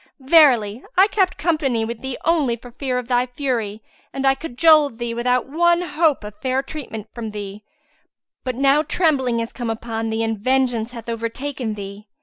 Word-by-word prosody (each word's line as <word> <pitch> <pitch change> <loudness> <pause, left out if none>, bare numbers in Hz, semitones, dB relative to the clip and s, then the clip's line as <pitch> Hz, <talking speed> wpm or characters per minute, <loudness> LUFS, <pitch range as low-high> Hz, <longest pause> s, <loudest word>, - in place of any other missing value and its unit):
Verily, 260 -7 +4
I 380 - +8
kept 380 -4 +1
company 285 -7 0
with 230 0 -6
thee 265 -1 -4
only 300 -7 +2
for 240 +1 -13
fear 255 0 -2
of 250 -2 -4
thy 245 0 +1
fury 240 -5 -3 0.3
and 270 0 -3
I 270 - +5
cajoled 300 -1 +3
thee 235 -1 -3
without 250 +1 +1
one 345 +4 +2
hope 315 -5 +1
of 210 0 -10
fair 260 +1 0
treatment 245 -8 -7
from 230 -2 -5
thee: 205 0 -7 0.8
but 255 -2 -3
now 275 +3 +4
trembling 275 -8 +1
is 230 - -5
come 240 -3 -4
upon 225 0 -3
thee 220 +1 -1
and 225 -2 -2
vengeance 245 -1 +1
hath 230 -1 -9
overtaken 230 +1 -4
thee." 200 +1 -9
250 Hz, 175 wpm, -21 LUFS, 225-285 Hz, 0.8 s, I